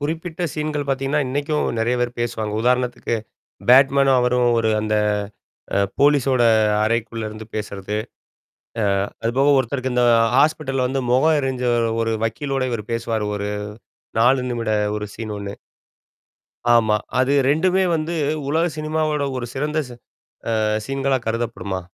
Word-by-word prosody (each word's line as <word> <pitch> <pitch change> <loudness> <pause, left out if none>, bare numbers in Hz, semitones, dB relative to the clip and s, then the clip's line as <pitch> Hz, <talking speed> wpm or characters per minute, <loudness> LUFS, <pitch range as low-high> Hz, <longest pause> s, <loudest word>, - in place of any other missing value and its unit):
குறிப்பிட்ட 160 +3 -4
சீன் 155 0 -3
கள் 145 -1 -3
பார்த்தீங்கன்னா, 135 +2 0
இன்னைக்கும் 145 +3 -1
நெறைய 115 +2 +1
பேர் 120 0 -2
பேசுவாங்க. 110 -3 -2
உதாரணத்துக்கு, 125 -1 0 0.5
பேட்மேனும் 135 +1 +5
அவரும் 125 0 +2
ஒரு 115 -1 +1
அந்த 110 0 0 0.8
அ - - +3 0.2
போலீஸோட 140 -3 +3 0.4
அறைக்குள்ள 115 0 -1
இருந்து 110 0 -9
பேசுறது. 105 -1 -4 1.1
அ - - -9 0.2
அதுபோக 135 +5 +2
ஒருத்தருக்கு 130 0 -2
இந்த 125 0 +3 0.3
ஹாஸ்பிட்டல 135 -3 +2
வந்து 135 +2 -1
முகம் 155 +6 +4
எரிஞ்ச 130 -2 -2 0.4
ஒரு 115 0 0
வக்கீலோட 135 +4 -2
இவர் 115 -3 -3
பேசுவாரு 115 -2 -2
ஒரு 100 0 -3 0.7
4 125 +3 +4
நிமிட 115 -2 -2 0.3
ஒரு 105 - -4
சீன் 110 -2 -6
ஒண்ணு. 100 0 -6 1.2
ஆமா, 110 -2 +3 0.2
அது 130 +2 +2 0.2
2 185 +6 +2
வந்து 160 +1 -2 0.3
உலக 160 +3 +2
சினிமாவோட 155 -1 -1
ஒரு 120 -1 -3
சிறந்த 150 +3 -1
ச - - -13 0.7
அ - - +1 0.2
சீன்களா 135 -1 0
கருதப்படுமா? 110 -4 -3
130 Hz, 130 wpm, -21 LUFS, 115-145 Hz, 1.2 s, பேட்மேனும்